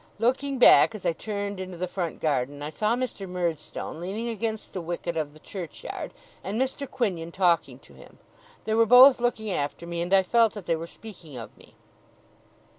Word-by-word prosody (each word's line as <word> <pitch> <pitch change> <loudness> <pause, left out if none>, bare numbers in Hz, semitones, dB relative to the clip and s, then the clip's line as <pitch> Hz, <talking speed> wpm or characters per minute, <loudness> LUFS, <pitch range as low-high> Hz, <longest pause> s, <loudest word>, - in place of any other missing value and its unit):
Looking 260 +5 0
back 225 -2 +7
as 210 - -9
I - - +2
turned 200 +1 -4
into 185 -1 -6
the 185 +2 -2
front 175 -2 -4
garden, 145 -1 -1
I 150 - -4
saw 215 +7 +1
Mr. 240 -6 -4
Murdstone 170 -3 -4
leaning 205 +7 -4
against 220 -1 -4
the 185 - -3
wicket 170 0 -4
of 155 -2 -2
the 155 - -16
churchyard, 175 -1 -7 0.3
and 205 +4 -3
Mr. 265 +1 -2
Quinion 185 -10 -2
talking 175 -2 +1
to - - -20
him. - - -16 0.5
They 220 - -1
were 225 0 +4
both 250 +2 +8
looking 220 -3 -1
after 145 0 -3
me, 170 0 -4
and 175 +2 -3
I 195 -1 +6
felt 225 +3 +3
that 205 -4 -7
they 165 - +1
were 165 +1 -6
speaking 170 - -12
of 115 -2 -9
me. - - -20
190 Hz, 190 wpm, -26 LUFS, 170-225 Hz, 0.5 s, both